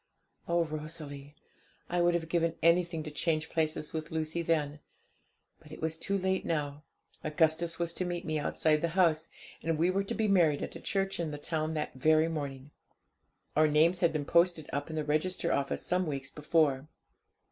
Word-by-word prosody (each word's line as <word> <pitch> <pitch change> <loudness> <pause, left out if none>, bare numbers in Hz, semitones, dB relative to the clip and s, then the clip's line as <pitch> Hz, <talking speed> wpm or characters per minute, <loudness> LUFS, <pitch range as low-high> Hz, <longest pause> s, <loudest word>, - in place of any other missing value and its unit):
Oh, 170 0 +2
Rosalie, 150 -2 -7 0.5
I 175 0 0
would 175 0 +3
have 165 -1 -1
given 165 0 +1
anything 170 -1 +3
to 155 - -6
change 160 +1 -1
places 155 -1 -1
with 160 0 -4
Lucy 160 +1 -2
then! 150 -3 0 0.8
But 150 - -16
it - - -9
was 160 0 -1
too 195 +4 -1
late 190 0 0
now; 150 -3 -2 0.4
Augustus 160 +2 +1
was 170 -1 -1
to 185 - -1
meet 175 -1 -3
me 155 -1 -1
outside 150 +1 +1
the 170 - +2
house, 165 -3 +3 0.3
and 165 -1 0
we 170 +3 +3
were 195 +1 +1
to 230 - -3
be 220 -1 +1
married 170 -7 +3
at - - -6
a - - -6
church 195 -1 -1
in 165 -2 -1
the 145 - -5
town 155 +1 -2
that 150 - -2
very 155 +4 +3
morning. 140 -3 -5 0.8
Our 155 +1 +5
names 160 +4 +4
had 170 -2 +3
been 150 -2 -2
posted 170 -1 +3
up 145 +3 -2
in 160 - -5
the 155 -1 -1
register 155 +5 0
office 140 0 -1
some 180 0 +1
weeks 135 -2 -4
before. 150 -2 +1
160 Hz, 190 wpm, -31 LUFS, 150-170 Hz, 0.8 s, Our